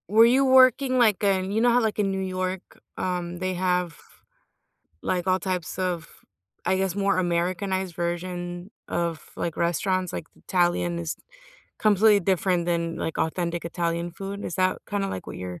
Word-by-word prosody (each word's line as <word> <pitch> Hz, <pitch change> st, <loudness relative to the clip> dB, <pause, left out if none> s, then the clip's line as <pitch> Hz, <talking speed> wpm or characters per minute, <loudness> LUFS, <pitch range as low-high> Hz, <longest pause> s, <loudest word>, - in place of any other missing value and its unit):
Were 220 Hz, +3 st, +7 dB
you 255 Hz, +3 st, +4 dB
working, 260 Hz, 0 st, +5 dB
like, 220 Hz, -5 st, +3 dB
in 190 Hz, -1 st, +1 dB
you 220 Hz, +2 st, +1 dB
know 240 Hz, -, +5 dB
how, 245 Hz, +1 st, +4 dB
like, 220 Hz, -2 st, -1 dB
in 200 Hz, -2 st, +2 dB
New 190 Hz, -, -2 dB
York, 185 Hz, 0 st, -4 dB, 0.2 s
um, 175 Hz, -1 st, -2 dB
they 185 Hz, +1 st, -2 dB
have, 180 Hz, -2 st, 0 dB, 1.1 s
like, 180 Hz, -1 st, -1 dB
all 185 Hz, 0 st, +3 dB
types 185 Hz, -4 st, -3 dB
of 180 Hz, -3 st, -2 dB, 0.6 s
I 190 Hz, -, +2 dB
guess, 190 Hz, -1 st, 0 dB
more 200 Hz, -1 st, +1 dB
Americanized 185 Hz, +1 st, -1 dB
version 175 Hz, +1 st, -4 dB, 0.2 s
of, 170 Hz, -2 st, -3 dB
like, 170 Hz, -, -3 dB
restaurants? 180 Hz, +2 st, 0 dB
Like, -, -, -5 dB
the -, -, -25 dB
Italian 175 Hz, -1 st, +1 dB
is 165 Hz, -2 st, -3 dB, 0.6 s
completely 210 Hz, 0 st, +5 dB
different 180 Hz, -1 st, +1 dB
than, 170 Hz, -1 st, 0 dB
like, 160 Hz, -, -3 dB
authentic 170 Hz, +1 st, -1 dB
Italian 170 Hz, 0 st, -2 dB
food, 195 Hz, +3 st, -6 dB
is -, -, -4 dB
that, 185 Hz, 0 st, +2 dB
kinda, 200 Hz, -1 st, -1 dB
like, 95 Hz, -, -5 dB
what -, -, -7 dB
your 90 Hz, -1 st, -6 dB
185 Hz, 170 wpm, -25 LUFS, 170-195 Hz, 1.1 s, Were